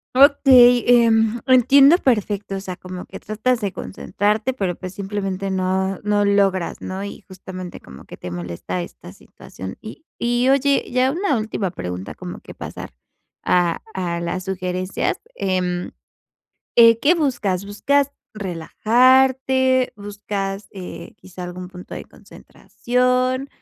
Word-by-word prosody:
Okey, 260 -3 +6
em, 230 -1 +4
entiendo 270 +5 +6
perfecto, 210 - 0
o - - -3
sea, 185 -2 -6
como 185 0 -8
que - - -10
tratas 225 +4 -1
de 200 - -1
concentrarte, 205 - -2
pero 190 -7 -2
pues 185 +1 -8
simplemente 195 -1 -3
no 190 0 -1
no 205 0 +1
logras, 195 -3 +1
¿no?, 190 +1 -5
y 200 - -8
justamente 185 -1 -9
como 65 - -13
que - - -11
te 90 - -7
molesta 90 +1 -5
esta - - -10
situación, 95 0 -11
y 220 +9 -11
y 240 +2 +1
oye, 275 +1 +3
ya 255 +1 +2
una 325 - 0
última 215 -3 -2
pregunta, 90 - -6
como - - -8
que - - -12
pasar - - -8 0.5
a 175 -2 +1
a 175 -2 -2
las 180 +2 -3
sugerencias, 185 -1 -2 0.2
em, 180 -2 -2 0.9
eh, 230 -1 +7
¿qué 310 +7 +4
buscas? 225 - -1
¿Buscas 280 +8 +1 0.2
relajarte, 255 +7 +2
buscas, 200 -1 -5
eh, 185 -2 -9
quizás 180 -1 -9
algún 180 +1 -8
punto 180 -1 -10
de - - -7
concentración 250 +2 -2
205 Hz, 135 wpm, -21 LUFS, 185-250 Hz, 0.9 s, eh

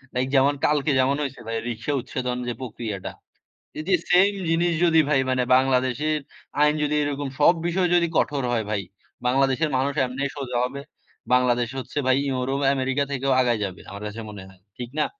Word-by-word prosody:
Like 130 +1 +1
যেমন 140 +2 +4
কালকে 150 0 +2
যেমন 130 +2 +3
হইছে 135 -3 -5
ভাই 115 0 -2
রিক্শা 120 +5 -3
উচ্ছেদন 125 0 -3
যে 120 - -1
প্রক্রিয়াটা। 110 -6 -5 0.7
এই - - -3
যে 185 - +5 0.2
সেম 190 +3 +6 0.2
জিনিস 170 +1 +2
যদি 160 -1 +5
ভাই 145 - +3
মানে 130 -1 +1
বাংলাদেশের 130 +3 +1 0.4
আইন 150 0 +5
যদি 150 0 0
এরকম 145 -1 -2
সব 150 +4 +6
বিষয় 180 +1 +1
যদি 170 -1 +3
কঠোর 140 -2 +1
হয় 115 -2 0
ভাই, 105 -2 -1 0.4
বাংলাদেশের 135 +4 +2
মানুষ 140 +2 0
এমনি 130 +2 -4
সোজা 130 -3 -3
হবে। 140 +2 -6 0.5
বাংলাদেশ 125 -1 +3
হচ্ছে 130 - -8
ভাই 130 0 +4
ইউরোপ 130 +1 -1 0.2
আমেরিকা 135 +1 0
থেকেও 135 0 -1
আগায় 120 -3 +1
যাবে। 95 0 -7
আমার 100 +1 -8
কাছে 105 +2 -7
মনে 105 -2 -9
হয় 95 -1 -20 0.2
ঠিক 120 -1 -6
না? - - +3
130 Hz, 180 wpm, -24 LUFS, 125-145 Hz, 0.7 s, সেম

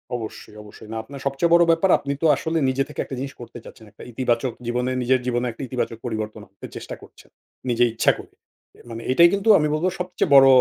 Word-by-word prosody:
অবশ্যই, 110 -2 -8
অবশ্যই। 105 +1 -14
না 115 - -3
আপনার 140 +3 -10
সবচেয়ে 140 +5 0
বড় 170 0 +7
ব্যাপার 165 +4 +2
আপনি 140 0 -4
তো - - +1
আসলে 160 +3 -2
নিজে 135 +1 0
থেকে 150 - -10
একটা 135 - -7
জিনিস 135 +1 -5
করতে 120 0 -10
চাচ্ছেন। 110 - -14
একটা 105 - -14
ইতিবাচক 120 +1 -1
জীবনে 125 +2 -1
নিজের 130 +1 +2
জীবনে 125 0 0
একটা 115 - -9
ইতিবাচক 120 -3 -3
পরিবর্তন 110 -2 -4
আনতে 100 - -11
চেষ্টা - - -7
করছেন, - - -17 0.4
নিজে 120 0 +2
ইচ্ছা 115 - +3
করে। - - -13 0.6
মানে 115 0 -7
এটাই 170 +6 +6
কিন্তু 200 +3 0
আমি 150 - +1
বলবো 165 +4 +1
সবচেয়ে 180 -3 -2
বড় 135 0 +9
130 Hz, 210 wpm, -22 LUFS, 115-150 Hz, 0.6 s, বড়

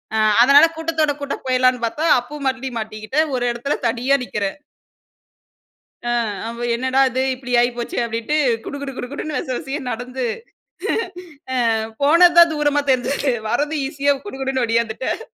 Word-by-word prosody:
அ - - +1 0.3
அதனால 280 +4 +7
கூட்டத்தோட 320 -2 0
கூட்ட 280 0 -3
போயிரலாம்னு 255 -1 +2
பாத்தா, 310 +8 -3
அப்பவும் 280 +2 -6
மறுபடி 260 0 -4
மாட்டிக்கிட்டேன். 215 +8 -2
ஒரு 245 - -2
எடத்துல 240 +5 -2
தனியா 250 +4 +1
நிக்கிறேன். 205 +1 -3 1.5
அ - - +1 0.4
அவ 235 +1 -5
என்னடா 260 +2 +1
இது 260 +1 -1
இப்படி 255 -1 -8
ஆயிப்போச்சே 240 0 -1
அப்படின்ட்டு 230 +7 -2 0.3
குடு 285 -2 -6 0.2
குடுன்னு 295 +1 -4
விச - - -5
விசையா 285 0 -4
நடந்து, 250 +2 -4 1.5
ஆ - - +3 0.3
போனது 340 +4 +6
தான் 340 -1 +8
தூரமா 290 -1 +1
தெரிஞ்சது. 265 +1 +1 0.2
வர்றது 295 +6 0
ஈசியா 285 0 +1
குடு 335 - -7
குடுன்னு 265 -1 0
ஓடியாந்துட்டேன். 230 - -1
265 Hz, 135 wpm, -20 LUFS, 240-290 Hz, 1.5 s, தான்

